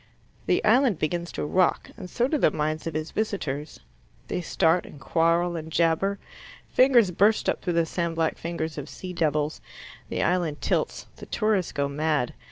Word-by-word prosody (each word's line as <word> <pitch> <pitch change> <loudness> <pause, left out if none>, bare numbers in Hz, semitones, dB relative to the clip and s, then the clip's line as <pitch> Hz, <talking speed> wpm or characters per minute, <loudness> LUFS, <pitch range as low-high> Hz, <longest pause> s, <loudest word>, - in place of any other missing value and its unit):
The - - +2
island 235 - +4
begins 170 +3 -2
to - - -3
rock, 185 +4 +1
and 180 - -9
so 240 +6 +1
do 300 +1 0
the - - +5
minds 155 +2 -2
of 160 - -4
its 155 0 -3
visitors. 155 -9 -3 0.5
They - - -2
start 170 0 +2
and 145 - -12
quarrel 170 +4 +1
and 160 -1 -6
jabber. 170 +5 +1 0.5
Fingers 245 -7 +5
burst 205 +5 +3
up - - 0
through 175 - -1
the 170 0 +2
sand 170 0 -2
black 165 -1 0
fingers 160 -2 -4
of 145 +1 -7
sea 185 -1 -7
devils. 150 -2 0 0.5
The - - -1
island 175 -4 0
tilts. - - -1
The - - -10
tourists 215 -5 0
go 140 0 -1
mad. 150 -2 0
170 Hz, 175 wpm, -26 LUFS, 155-185 Hz, 0.5 s, the